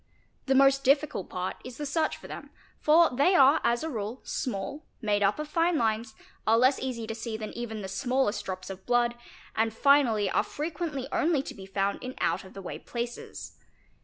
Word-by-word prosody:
The 265 - +3
most 275 0 +5
difficult 275 -6 +2
part 180 0 -3
is 250 -1 -9
the 295 - -4
search 310 +2 0
for - - -12
them, - - -8 0.3
for 320 +2 +5
they 285 +9 +3
are 280 +1 +6
as 235 +3 +1
a - - -2
rule 220 +1 -4
small, 255 +6 -4 0.2
made 205 -1 +1
up 200 0 +3
of 305 0 -4
fine 330 +2 +2
lines, 220 -1 0 0.3
are 225 +1 +5
less 255 +3 +4
easy 245 -4 -3
to 225 - -4
see 225 0 -5
than 215 -1 -6
even 220 -3 -5
the - - -4
smallest 245 -1 0
drops 185 0 -5
of 190 0 -10
blood, 240 -1 +3 0.4
and 225 0 +2
finally 250 -7 +4
are - - +2
frequently 300 -3 -4
only 310 -4 +2
to - - -7
be 190 -1 -11
found 195 +1 -1
in 255 +1 -6
out 170 +3 0
of 190 0 -14
the 195 - -8
way - - -6
places. 240 0 -6
240 Hz, 200 wpm, -28 LUFS, 210-280 Hz, 0.4 s, are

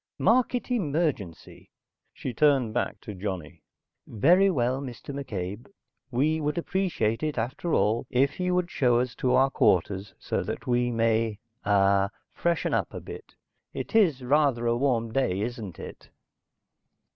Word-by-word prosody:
"Mark 245 +5 +3
it 245 - -4
emergency." 150 - -2 0.4
She 130 - -6
turned 135 -4 +3
back 120 - -2
to 105 - -7
Johnny. 90 -5 -6 0.5
"Very 175 - +4
well, 130 -5 0
Mr. 130 +1 -7
McCabe, 105 -6 -5 0.4
we 150 +5 +1
would 150 +1 -1
appreciate 170 - -1
it, 155 -1 -2
after 130 +9 -1
all, 110 +3 +1
if 135 +5 +1
you 180 0 +1
would 180 -1 0
show 120 -3 +3
us 125 -1 -1
to 125 - +2
our 135 +1 +4
quarters 95 0 +1
so - - -2
that - - -5
we 120 0 +1
may 115 -2 +1 0.3
ah 100 -1 +3 0.2
freshen 170 0 0
up - - 0
a - - -4
bit. - - -11 0.4
It - - -5
is 165 - +4
rather 135 -3 +2
a 115 0 +2
warm 120 -3 0
day, 115 -7 0
isn't 110 -6 -5
it?" - - -10
125 Hz, 150 wpm, -27 LUFS, 110-150 Hz, 0.5 s, Very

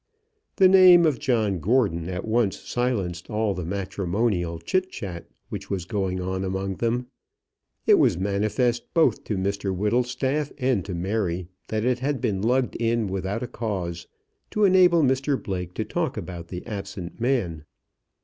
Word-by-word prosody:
The 190 - +6
name 185 -2 +8
of 150 -5 +1
John 110 -7 +1
Gordon 95 -5 +1
at 90 +3 -4
once 110 -3 +1
silenced 100 -9 -2
all 110 -2 0
the 90 -1 -4
matrimonial 95 0 -1
chit 185 - -1
chat 90 - -7 0.2
which - - -6
was 95 -3 -2
going 95 -2 -2
on 95 +1 -2
among 95 0 -2
them. 120 +2 0 0.8
It - - +6
was - - +3
manifest 105 - 0
both 165 - +3
to 105 - -2
Mr 100 +1 -1
Whittlestaff 125 +8 0
and 125 -8 +1
to 95 - -4
Mary 90 -1 -2 0.2
that 110 +1 -1
it 125 -1 +1
had 140 +1 -1
been 95 -4 -1
lugged 125 +3 +1
in 115 -1 +1
without 95 +3 -3
a - - -3
cause, 90 -8 -4 0.4
to 210 -1 +2
enable 180 -3 +5
Mr 135 +1 +2
Blake 90 -2 -5
to - - -2
talk - - -2
about 85 -2 -6
the 90 0 -7
absent 100 -3 -6
man. 100 - 0
105 Hz, 160 wpm, -25 LUFS, 95-125 Hz, 0.8 s, name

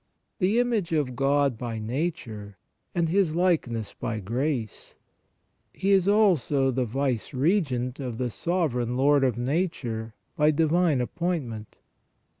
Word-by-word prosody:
The 200 +4 +2
image 230 -8 +1
of 140 -5 0
God 140 -2 +1
by 115 -2 -4
nature, 110 - -4 0.4
and 170 -1 +2
His 170 -2 +1
likeness 155 - 0
by 110 -2 -4
grace, 120 +3 -3 0.8
he 195 +1 0
is 195 -1 +4
also 170 - +3
the 130 0 0
vicegerent 130 - 0
of 125 -4 -4
the 125 -1 -2
Sovereign 125 - -1
Lord 140 +1 +4
of 125 -4 +1
nature 120 -6 -2 0.2
by 150 0 +4
divine 160 -1 +2
ap 125 - -4
pointment. 135 -12 -3
140 Hz, 125 wpm, -26 LUFS, 120-170 Hz, 0.8 s, is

